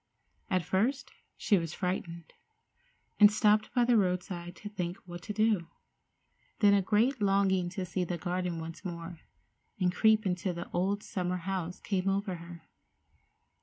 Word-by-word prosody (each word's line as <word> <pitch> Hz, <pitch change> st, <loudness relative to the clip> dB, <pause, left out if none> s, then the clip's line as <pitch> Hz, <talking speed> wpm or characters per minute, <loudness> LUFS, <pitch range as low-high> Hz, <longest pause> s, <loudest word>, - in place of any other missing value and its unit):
At 185 Hz, -3 st, +1 dB
first 235 Hz, -, 0 dB, 0.3 s
she 200 Hz, -4 st, +3 dB
was 165 Hz, 0 st, -5 dB
frightened, 170 Hz, -2 st, -4 dB, 0.9 s
and 205 Hz, -1 st, +9 dB
stopped 215 Hz, 0 st, +3 dB
by 245 Hz, -1 st, +4 dB
the 240 Hz, -1 st, +4 dB
roadside 180 Hz, -2 st, -2 dB
to 210 Hz, -, -9 dB
think 180 Hz, -3 st, -4 dB
what 175 Hz, -1 st, -8 dB
to 210 Hz, -, -6 dB
do. 215 Hz, -5 st, +1 dB, 0.9 s
Then 205 Hz, -2 st, +5 dB
a 200 Hz, -, +4 dB
great 225 Hz, +6 st, +2 dB
longing 195 Hz, -2 st, +2 dB
to 185 Hz, +1 st, -4 dB
see 180 Hz, +1 st, -2 dB
the 175 Hz, 0 st, -3 dB
garden 180 Hz, 0 st, -2 dB
once 165 Hz, +3 st, -8 dB
more, 170 Hz, -2 st, -6 dB, 0.6 s
and 180 Hz, -2 st, +2 dB
creep 220 Hz, +1 st, +4 dB
into 180 Hz, 0 st, -1 dB
the 170 Hz, 0 st, -6 dB
old 195 Hz, +3 st, 0 dB
summer 180 Hz, -1 st, -2 dB
house, 180 Hz, -1 st, -4 dB
came 195 Hz, -1 st, -1 dB
over 195 Hz, -1 st, -1 dB
her. 170 Hz, 0 st, -11 dB
185 Hz, 155 wpm, -30 LUFS, 175-205 Hz, 0.9 s, and